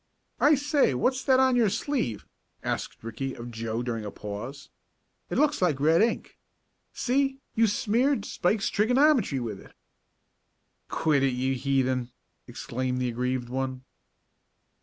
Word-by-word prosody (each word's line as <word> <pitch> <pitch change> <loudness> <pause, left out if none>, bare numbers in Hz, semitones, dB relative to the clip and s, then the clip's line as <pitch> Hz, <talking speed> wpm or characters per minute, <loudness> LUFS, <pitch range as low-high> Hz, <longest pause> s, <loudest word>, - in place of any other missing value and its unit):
"I 300 +1 +6
say, 285 - +2
what's 260 - +1
that 260 -1 +5
on 260 -1 +4
your 230 -4 +4
sleeve?" 200 - -2 0.4
asked - - -4
Ricky 115 +4 -4
of 120 +1 -8
Joe 115 +1 -3
during 115 -3 -3
a 105 - -4
pause. 105 +8 -7 0.6
"It - - -2
looks 295 -4 +2
like 160 -7 +2
red 160 +5 +4
ink. 230 +1 -1 0.5
See, 270 +1 0 0.2
you've 225 -1 +3
smeared 245 +1 +1
Spike's 195 +3 0
trigonometry 245 - +3
with 110 -5 -5
it." - - -16 1.2
"Quit 150 -4 +2
it, 135 -1 +2
you 130 +2 0
heathen!" 130 -1 0 0.4
exclaimed 125 +1 -3
the 125 -1 0
aggrieved 125 +1 -2
one. 130 0 -3
140 Hz, 140 wpm, -27 LUFS, -, 1.2 s, I